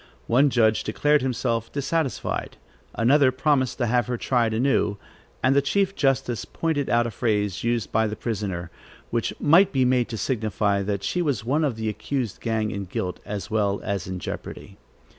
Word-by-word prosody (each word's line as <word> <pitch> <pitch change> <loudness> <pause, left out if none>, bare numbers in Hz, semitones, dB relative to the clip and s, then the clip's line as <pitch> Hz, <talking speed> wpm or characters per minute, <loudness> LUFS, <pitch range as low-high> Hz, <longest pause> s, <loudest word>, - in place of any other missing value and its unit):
One 135 +5 +4
judge 110 -4 +3
declared 145 +7 +2
himself 120 -3 -1
dissatisfied; 145 0 -2 0.4
another 130 +3 +4
promised 130 -1 +1
to 120 - 0
have 120 +1 +1
her 125 -1 -2
tried 120 -2 +1
anew; 110 -3 +1 0.5
and 135 - +4
the 140 - +5
chief 195 +7 +1
justice 135 -4 0
pointed 155 -4 -2
out 120 0 +3
a 120 - -3
phrase 105 -4 -1
used 115 -3 -1
by 110 0 +2
the 105 - -4
prisoner, 95 -8 -4 0.4
which 115 -1 0
might 185 +6 +5
be 130 -2 +2
made 125 -1 +2
to 115 - -4
signify 105 -3 0
that 100 0 -2
she 180 - 0
was 140 -10 -1
one 145 +6 +1
of 140 -6 0
the 110 0 -3
accused 120 +1 -3
gang 110 -2 -1
in 100 0 -4
guilt, 90 0 -4
as 105 0 -5
well 100 -2 +1
as 100 -4 -3
in 95 0 -4
jeopardy. - - -7
120 Hz, 180 wpm, -24 LUFS, 105-135 Hz, 0.5 s, the